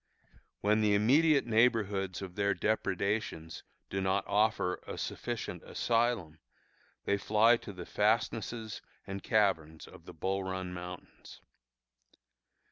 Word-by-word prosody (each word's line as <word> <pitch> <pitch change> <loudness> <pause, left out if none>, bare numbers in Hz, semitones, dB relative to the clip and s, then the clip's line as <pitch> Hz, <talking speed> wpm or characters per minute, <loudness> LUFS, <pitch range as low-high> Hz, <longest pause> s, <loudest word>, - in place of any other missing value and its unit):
When 105 +2 +3
the 105 -1 +3
immediate 140 +8 +4
neighborhoods 105 -5 +1
of 95 -2 -7
their 100 +1 +1
depredations 100 -5 -1 0.3
do 95 - -1
not 95 +1 +1
offer 105 -3 +1
a - - -5
sufficient - - -4
asylum, 115 -9 0 0.7
they 100 - +2
fly 110 +4 +5
to 100 - -9
the 90 -3 -8
fastnesses 110 +1 -1 0.2
and 100 0 -5
caverns 90 -8 +1
of - - -15
the - - -10
Bull 95 +4 -1
Run 95 -1 -4
Mountains. 90 0 -10
100 Hz, 120 wpm, -31 LUFS, 95-110 Hz, 0.7 s, fly